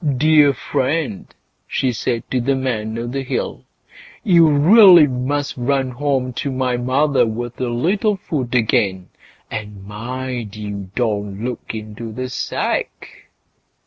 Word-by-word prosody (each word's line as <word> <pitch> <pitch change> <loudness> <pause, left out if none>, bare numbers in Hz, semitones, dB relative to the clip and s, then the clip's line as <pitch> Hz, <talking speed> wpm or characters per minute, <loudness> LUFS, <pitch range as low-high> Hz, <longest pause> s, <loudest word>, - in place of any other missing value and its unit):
"Dear 150 -1 +5
friend", 140 - -2 0.4
she 130 -2 0
said 115 +1 -2
to 130 - +1
the 135 +3 +1
Man 115 -4 -2
o' 115 - -3
the 130 +3 -3
Hill, 130 - -4 0.6
"you 170 -6 +5
really 175 +3 +7
must 140 +2 -2
run 130 +1 0
home 130 -1 -1
to 140 - -2
my 130 -1 0
mother 130 +2 +2
with 120 +3 -5
a 125 - -1
little 195 - 0
food 130 -9 -3
again; 100 -5 +1 0.4
and 105 -2 -7
mind 120 +1 -5
you 100 -2 -6
don't 105 -3 -2
look 125 -2 -5
into 110 +1 -7
the 130 +3 -5
sack." 125 - -4
125 Hz, 135 wpm, -19 LUFS, 110-140 Hz, 0.6 s, really